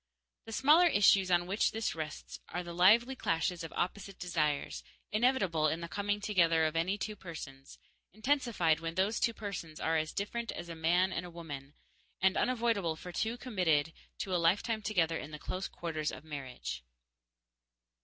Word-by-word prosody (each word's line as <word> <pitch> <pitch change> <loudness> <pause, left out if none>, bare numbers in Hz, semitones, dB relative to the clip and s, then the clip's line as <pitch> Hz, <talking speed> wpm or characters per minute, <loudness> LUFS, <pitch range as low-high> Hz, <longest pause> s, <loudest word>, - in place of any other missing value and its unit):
_ - - -46
The - - -9
smaller 300 +10 +6
issues 200 - +5
on 175 -1 +3
which 195 +4 +2
this 225 0 -1
rests 155 -2 -6
are 180 - -3
the 175 0 -7
lively 225 +9 +5
clashes 170 -5 -1
of 165 - -6
opposite 195 +2 -3
desires, 155 -5 -1 0.3
inevitable 205 -9 +2
in 160 +2 -1
the 170 - -4
coming 205 +3 -1
together 170 -6 +3
of 155 +1 -1
any 180 +5 +1
two 210 +1 -4
persons, 145 -8 -9 0.3
intensified 220 - +1
when 165 0 -4
those 195 +4 +1
two 230 - +1
persons 180 -7 -6
are 160 0 +1
as 155 0 -1
different 230 +4 -3
as 170 0 -7
a 165 - -5
man 175 +4 +2
and 170 - -2
a 180 - -8
woman, 145 -5 -8 0.4
and 190 +1 +3
unavoidable 230 -9 +1
for 180 +3 -9
two 225 +6 -1
committed 170 - +1 0.2
to 190 - -3
a 175 - +2
lifetime 205 +6 +2
together 170 -6 +1
in 150 - -7
the 155 - -7
close 185 +5 -4
quarters 155 -3 -3
of 130 - -9
marriage. 130 - -6
180 Hz, 175 wpm, -32 LUFS, 160-210 Hz, 0.4 s, smaller